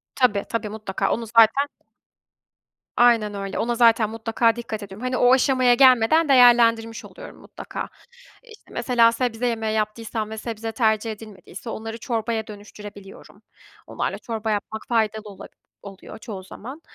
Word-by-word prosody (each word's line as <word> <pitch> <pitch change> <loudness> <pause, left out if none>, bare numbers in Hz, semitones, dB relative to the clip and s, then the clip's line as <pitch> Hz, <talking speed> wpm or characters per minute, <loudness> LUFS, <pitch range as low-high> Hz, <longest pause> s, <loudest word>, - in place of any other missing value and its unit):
Tabii, 210 -6 +2
tabii, 230 -2 -3
mutlaka 205 -2 -3
onu 230 - -2
zaten 230 +5 +4 1.3
aynen 230 -4 +4
öyle. 195 -1 -5
Ona 235 +1 -1
zaten 230 -2 +4
mutlaka 225 +1 0
dikkat 230 -3 -6
ediyorum. 200 +4 -10
Hani, 255 0 -1
o 245 +1 +5
aşamaya 255 -1 +3
gelmeden 260 +5 +4
değerlendirmiş 235 -3 +4
oluyorum - - -12
mutlaka. - - -8 0.5
İşte 455 -3 -17
mesela 235 -2 +3
sebze 240 0 -2
yemeği 220 -2 -2
yaptıysam 215 0 -3
ve 220 - -7
sebze 225 0 -5
tercih 220 -1 0
edilmediyse 210 0 -11
onları 225 0 -6
çorbaya 225 -1 -3
dönüştürebiliyorum. 205 -1 -12 0.5
Onlarla - - -3
çorba 225 -2 -4
yapmak 215 +1 -4
faydalı 220 -2 0
ola 195 -1 -11 0.3
oluyor 195 -1 -11
çoğu 200 -4 -8
zaman. 260 - -10
225 Hz, 140 wpm, -23 LUFS, 215-240 Hz, 1.3 s, o